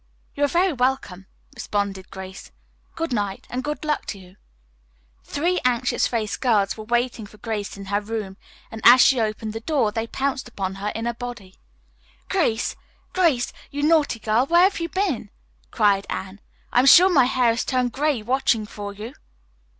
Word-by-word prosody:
"You 290 - -2
are - - +2
very 350 +4 +2
welcome," 245 -8 -1 0.3
responded 200 -2 -3
Grace. 190 0 -9 0.4
"Good 325 -5 -3
night, 205 -3 -2
and 255 +1 -3
good 300 +1 -4
luck 300 -1 -1
to 200 - -5
you." 185 0 -16 0.9
Three 350 +5 0
anxious 250 0 +1
faced 220 -3 -3
girls 210 -6 +2
were 215 - -9
waiting 240 -1 -1
for 215 - -17
Grace 210 -3 -4
in 200 - -8
her 200 +1 -1
room, 210 -3 -5 0.3
and 225 - -8
as 245 +2 +9
she 260 0 +5
opened 215 0 -3
the 225 - -4
door 240 -3 0
they 225 +1 -3
pounced 270 +1 -2
upon 195 -5 -4
her 205 - -2
in 225 +1 -3
a 235 - -1
body. 235 -6 -9 0.7
"Grace, 290 -12 0 0.4
Grace, 325 -10 +2 0.2
you 285 +1 -4
naughty 305 -5 +3
girl, 220 +4 +1
where 345 +3 +5
have 390 0 +2
you 335 0 -3
been?" 340 - -1 0.4
cried 200 -3 +2
Anne. 190 +1 -5 0.3
"I - - +5
am 260 - +4
sure 350 +6 +9
my 265 -6 +6
hair 250 -2 +2
has 230 - -1
turned 255 -2 0
gray 285 -3 0
watching 240 -2 +1
for 205 -1 -7
you." 215 +5 -8
235 Hz, 180 wpm, -23 LUFS, 205-275 Hz, 0.9 s, as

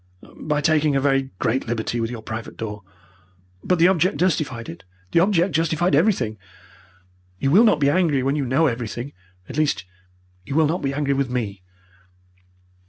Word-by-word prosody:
"By 150 -1 -2
taking 155 -1 +2
a - - +3
very 135 -1 +1
great 125 +7 -1
liberty 120 +1 -2
with 115 -1 -1
your 115 -2 -7
private 110 +1 -7
door. 105 -2 -5 0.8
But 180 - +1
the 170 +2 +5
object 185 +1 +2
justified 150 -10 -1
it. 85 - -9 0.3
The - - +4
object 180 -1 +2
justified 165 +3 +1
everything. 110 - +1 1.0
You 135 +7 0
will 200 +9 +7
not 215 -10 +4
be 140 -1 +3
angry 155 -6 +2
when 135 +2 0
you 145 - -1
know 130 +6 +2
everything 120 0 -3 0.3
at 135 - -8
least, 145 -11 0 0.6
you 135 - -6
will 160 0 +4
not 165 +5 -1
be 135 - -1
angry 140 -1 0
with 135 -1 -1
me. 110 -6 -3
140 Hz, 170 wpm, -22 LUFS, 120-160 Hz, 1.0 s, will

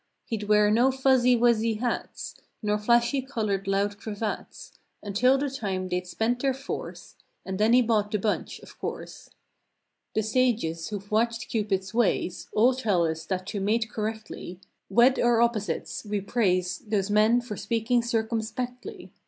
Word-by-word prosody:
He'd 215 -3 -4
wear 210 0 +4
no 240 +4 +4
"fuzzy 260 -2 +4
wuzzy" 230 -1 +3
hats. 240 +2 -3 0.3
Nor 210 0 +1
flashy 235 +5 +3
colored 215 -7 -2
loud 200 +1 0
cravats 210 0 -5 0.3
Until 225 +6 +3
the 285 +1 -1
time 195 -9 -3
they'd 180 0 -2
"spent 235 +6 -1
their 270 -2 +1
force" 270 +1 -7 0.3
And 190 0 -4
then 220 +2 +4
he 250 0 +6
bought 215 -3 +1
the 210 - 0
bunch, 210 +1 -2
of - - -15
course. - - -6 0.9
The 220 - +2
sages 215 -8 0
who've 205 -1 -7
watched 230 +2 0
Cupid's 200 -3 -1
ways 225 -6 0
All 240 +5 +4
tell 210 -9 +1
us 160 0 -3
that 185 -1 -2
to 205 - -3
mate 220 +3 0
correctly— 215 -4 -5 0.3
"Wed 240 +6 +5
our 240 -1 +3
opposites." 235 -3 -1
We 210 -1 -2
praise 185 -4 0
Those 205 -2 -2
men 215 +3 +4
for 240 -3 -6
speaking 230 +3 0
circumspectly. 240 - -3
220 Hz, 155 wpm, -26 LUFS, 205-240 Hz, 0.9 s, he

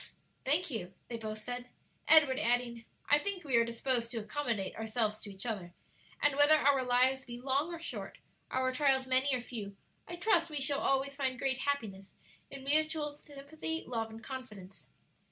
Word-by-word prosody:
"Thank 305 +5 +1
you," 185 -6 -5
they 235 - -3
both 215 -1 -5
said, 245 +1 -5 0.4
Edward 290 -5 +6
adding, 235 0 0 0.2
"I 290 - +5
think 375 +2 -2
we 270 -5 0
are 230 - +5
disposed 235 0 0
to 240 - -6
accommodate 225 -3 -2
ourselves 220 -1 -1
to 205 - -9
each 195 +2 -5
other, 190 -7 -4 0.5
and 290 -1 +4
whether 290 +2 +7
our 280 -3 +3
lives 255 +2 +3
be 240 -2 -8
long 275 +6 0
or 340 - -5
short, 335 - -6 0.3
our 260 0 +1
trials 265 0 +3
many 260 +2 +3
or 250 - -2
few, 210 -5 -7 0.3
I 345 - -5
trust 345 -2 +2
we 300 -2 -3
shall 275 +1 0
always 275 +1 +1
find 265 -2 -1
great 260 0 -1
happiness 215 -10 -3 0.3
in 275 -1 -9
mutual 300 0 +1
sympathy, 305 +3 -5
love 225 -2 -2
and 220 0 -11
confidence." 215 -8 -9
260 Hz, 175 wpm, -33 LUFS, 230-290 Hz, 0.5 s, whether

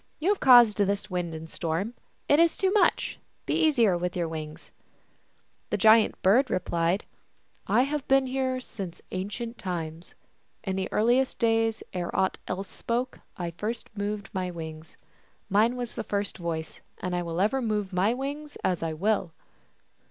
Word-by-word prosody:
You 330 +5 0
have 410 - +2
caused 240 -5 +7
this 200 0 0
wind 175 -2 -2
and 160 +1 -7
storm; 170 +8 -2 0.3
it 290 - +5
is 335 -1 +4
too 380 -1 +2
much. 420 - +2 0.3
Be - - -1
easier 240 - +4
with 175 0 -2
your 170 -1 0
wings! 155 -1 -7 0.5
" - - -40
The - - 0
Giant 220 0 +5
Bird 245 +8 +5
replied, 175 +1 0 0.3
" - - -38
I 250 - +6
have 290 +1 -3
been 270 0 +4
here 260 0 -1
since 195 -8 -7
ancient 220 +5 -4
times; 170 -2 -5 0.5
in 190 -2 -2
the 190 0 -3
earliest 245 +4 +2
days, 225 -1 +1
ere 180 -2 -2
aught 190 - +1
else 190 +2 -3
spoke, 245 +2 -3 0.2
I 175 -2 -3
first 225 +1 -4
moved 205 0 -3
my 185 -1 -2
wings; 160 -2 -8 0.5
mine 220 +5 +4
was 245 -2 -4
the - - -4
first 200 -2 -3
voice, 165 -2 -4 0.2
and 180 -1 -3
I 175 - 0
will 170 0 -3
ever 220 +8 +2
move 210 -4 -1
my 185 +4 +3
wings 285 +4 -5
as 180 -2 0
I 165 -1 -2
will." 185 0 0
205 Hz, 170 wpm, -27 LUFS, 175-245 Hz, 0.5 s, caused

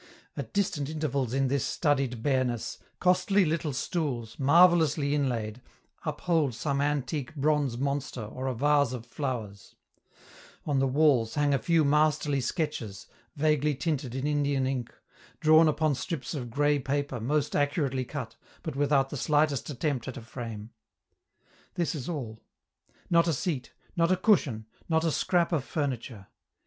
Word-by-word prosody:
At - - -6
distant 175 -8 -1
intervals 140 -6 -1
in 135 +1 +1
this 140 +1 0
studied 135 -7 0
bareness, 130 -4 0 0.2
costly 185 +2 +3
little 155 -1 -1
stools, 135 -5 -3
marvellously 155 -1 +4
inlaid, 125 -5 -1 0.5
uphold 155 -4 0
some 140 +4 -1
antique 145 -1 -2
bronze 145 -4 +1
monster 140 -2 -2
or 130 +5 -5
a 130 - -1
vase 145 0 +3
of 120 -2 -6
flowers; 120 -7 -5 0.9
on 145 -3 +1
the 135 - +2
walls 130 -5 +3
hang 145 -1 +2
a 135 - +2
few 165 -3 +2
masterly 150 -1 +2
sketches, 125 - -3 0.3
vaguely 150 -1 +2
tinted 135 -4 -2
in 135 +1 -2
Indian 145 -2 +1
ink, 130 -3 -2 0.5
drawn 155 +1 +6
upon 155 0 +2
strips 140 +3 -4
of 125 -6 -4
gray 145 +4 +2
paper 140 -1 -2
most 145 +5 0
accurately 145 -3 0
cut 125 -3 -6 0.3
but 160 -5 -4
without 140 -1 +2
the 145 - -4
slightest 150 -1 +1
attempt 140 -3 -2
at 130 - -5
a - - -6
frame. 115 -2 -7 1.0
This 170 -2 0
is 145 -3 -5
all: 120 -9 -5 0.7
not 170 0 +5
a 165 - +2
seat, 140 -4 -3 0.2
not 170 0 +2
a 185 - +3
cushion, 155 - +2 0.2
not 160 0 +2
a 165 - +2
scrap 175 +2 +1
of 155 -6 +1
furniture. 125 -9 -4
145 Hz, 150 wpm, -28 LUFS, 130-155 Hz, 1.0 s, drawn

